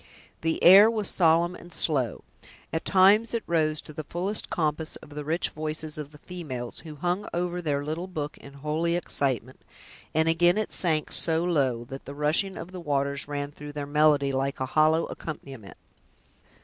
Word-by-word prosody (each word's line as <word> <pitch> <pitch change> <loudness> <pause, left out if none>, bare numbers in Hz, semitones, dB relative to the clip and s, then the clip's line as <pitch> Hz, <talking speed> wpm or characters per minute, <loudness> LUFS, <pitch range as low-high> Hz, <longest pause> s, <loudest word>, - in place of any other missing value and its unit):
The 160 0 -1
air 195 +5 +9
was 215 -4 -2
solemn 170 0 +3
and 175 -1 -12
slow. 135 -11 0 0.5
At 160 - -2
times 205 +5 +4
it 230 - -2
rose 155 -2 +1
to 155 - -11
the 155 +1 -5
fullest 185 +7 -3
compass 155 -1 -1
of 145 - -13
the 150 0 -6
rich 160 +4 -1
voices 155 0 -4
of 150 -1 -7
the 150 - -14
females, 145 -9 -6
who 155 -2 -9
hung 175 +6 -2
over 175 0 -2
their 145 -3 -1
little 160 +4 -4
book 150 -5 -5
in 140 - -13
holy 155 +4 -1
excitement, 130 -7 -2 0.5
and 160 +1 +2
again 175 +3 +4
it 215 - -2
sank 160 -4 +1
so 165 0 +5
low, 135 -9 +1
that 135 +3 -9
the 140 - -8
rushing 155 +6 +1
of 175 - -8
the 185 -1 -7
waters 140 -3 -1
ran 145 0 -4
through 145 0 -10
their 145 -1 -4
melody, 145 -1 +3
like 135 +1 -2
a 130 - -1
hollow 155 +1 +4
accompaniment. 135 - -8
155 Hz, 180 wpm, -26 LUFS, 145-175 Hz, 0.5 s, air